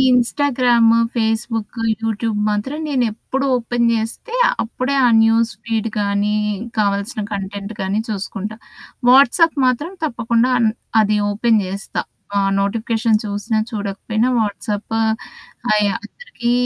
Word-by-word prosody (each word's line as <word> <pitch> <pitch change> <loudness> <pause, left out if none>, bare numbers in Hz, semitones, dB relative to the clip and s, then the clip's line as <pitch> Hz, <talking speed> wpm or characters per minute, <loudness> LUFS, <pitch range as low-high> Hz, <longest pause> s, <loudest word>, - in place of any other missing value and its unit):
Instagram, 245 -2 +3 0.2
Facebook, 225 0 -1 0.2
YouTube 225 -1 -1
మాత్రం 210 +9 -2
నేను 260 -4 +1
ఎప్పుడు 270 +5 -3
ఓపెన్ 235 0 0
జేస్తే 225 - -3 0.3
అప్పుడే 255 +4 -2
ఆ - - +5 0.2
న్యూస్‌ఫీడ్ 225 0 0
గాని 205 0 0 0.4
కావాల్సిన 200 +2 0
కంటెంట్‌ 200 +1 -5
గాని 195 +2 -1
చూసుకుంటా. 205 0 -4 0.5
వాట్సాప్ 280 +6 +5
మాత్రం 255 +7 0
తప్పకుండా 235 -3 +1
అన్ 230 -2 +3 0.3
అది 210 0 +2
ఓపెన్ 220 +2 +2
జేస్తా. 195 +1 -4 0.3
ఆ - - +4 0.2
నోటిఫికేషన్ 220 +2 +1
చూసినా 210 +2 -1
చూడకపోయినా 215 +2 -2
వాట్సాప్ 210 +1 -3 0.8
అయి 210 -1 +3
అందరికి 240 - -5
225 Hz, 110 wpm, -19 LUFS, 205-240 Hz, 0.8 s, ఆ